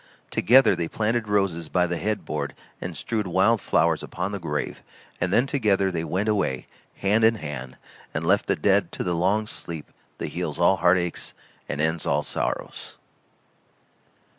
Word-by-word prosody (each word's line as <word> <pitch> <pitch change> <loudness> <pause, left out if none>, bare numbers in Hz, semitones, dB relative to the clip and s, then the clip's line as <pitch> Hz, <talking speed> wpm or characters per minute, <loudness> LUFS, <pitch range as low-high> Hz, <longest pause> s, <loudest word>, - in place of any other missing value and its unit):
Together 130 +7 +5
they 85 - -2
planted 110 +3 -1
roses 95 -6 0
by 90 -1 +2
the 85 0 -2
headboard 105 +2 -2 0.3
and - - -5
strewed 110 -4 -2
wild 95 +5 +3
flowers - - +2
upon 90 +3 -4
the 100 - -3
grave; 75 -4 -3 0.4
and 90 +1 +1
then 120 +6 +4
together 105 -9 +2
they 85 -2 -2
went 95 +5 -1
away, 95 -12 0 0.3
hand 105 +3 +2
in 115 +1 +6
hand, 70 - -6 0.3
and 75 +2 -3
left 100 +5 +3
the - - +2
dead 100 -3 +2
to - - -3
the 90 - 0
long 95 +6 +2
sleep 85 -7 -6 0.3
that - - -4
heals - - -3
all 95 - +4
heart 90 +1 +4
aches 85 -1 -3 0.3
and - - -3
ends 80 +1 0
all - - +2
sorrows. - - -4
95 Hz, 165 wpm, -25 LUFS, 85-105 Hz, 0.4 s, in